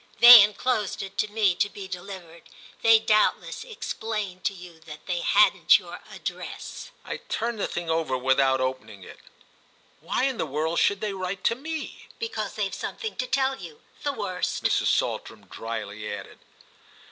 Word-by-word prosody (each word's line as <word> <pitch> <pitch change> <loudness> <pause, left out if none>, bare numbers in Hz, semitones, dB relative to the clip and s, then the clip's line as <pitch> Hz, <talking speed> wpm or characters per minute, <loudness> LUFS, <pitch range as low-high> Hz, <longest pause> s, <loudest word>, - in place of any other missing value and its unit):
"They 240 -2 +12
enclosed 210 0 0
it 195 0 -9
to 215 - +2
me, 210 -4 +3
to 205 +3 0
be 200 -1 -9
delivered. 180 -2 -9 0.3
They 225 0 +7
doubtless 215 - +1
explain 220 - -5
to - - 0
you 175 -3 -12
that 155 -1 -12
they 180 -2 -2
hadn't 350 - +5
your - - -10
address." - - -7 0.2
I - - -4
turned 230 -1 -3
the - - 0
thing 175 -1 -5
over 160 -5 0
without 130 +1 +2
opening 130 -6 -4
it. - - -13 0.8
"Why - - -2
in 265 -2 0
the - - -1
world 155 +4 -1
should 200 -1 +2
they 210 -2 -2
write 185 0 -4
to 230 - +2
me?" 315 +4 -7
"Because 455 0 -4
they've - - -2
something 445 -3 -5
to 255 - -2
tell 265 0 0
you. 165 -5 -11 0.2
The 290 - -1
worst," 195 -7 -3
Mrs. - - +2
Saltram - - -1
dryly 110 -2 -6
added. 100 - -8
190 Hz, 165 wpm, -26 LUFS, 160-225 Hz, 0.8 s, They